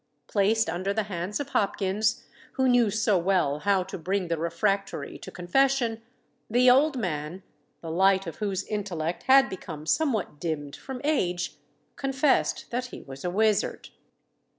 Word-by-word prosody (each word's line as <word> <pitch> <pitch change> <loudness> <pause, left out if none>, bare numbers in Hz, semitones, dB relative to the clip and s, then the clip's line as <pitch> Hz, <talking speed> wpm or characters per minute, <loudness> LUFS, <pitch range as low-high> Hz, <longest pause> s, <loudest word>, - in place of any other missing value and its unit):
Placed 220 +2 +2
under 185 +4 -2
the 220 - +1
hands 195 +1 -4
of 285 - -4
Hopkins, 200 +2 0 0.3
who 260 -1 +1
knew 245 -3 +4
so 210 -2 +2
well 170 -5 +1
how 195 +1 +2
to 190 0 -7
bring 185 +1 -1
the 165 - 0
refractory 195 +4 -1
to - - -9
confession, 235 +5 +1 0.5
the 250 +2 +5
old 280 +2 +4
man, 175 -3 -3 0.4
the 165 - -6
light 190 +2 +3
of 165 - -7
whose 200 -3 -2
intellect 180 -6 -3
had 270 0 +7
become 160 -5 -8
somewhat 220 - 0
dimmed 145 -4 -3
from 265 -2 -8
age, 180 - -1 0.4
confessed 270 +1 +1
that 250 +1 -2
he - - -10
was 135 0 -10
a 180 - -1
wizard. 215 +2 +1
195 Hz, 150 wpm, -27 LUFS, 175-235 Hz, 0.5 s, had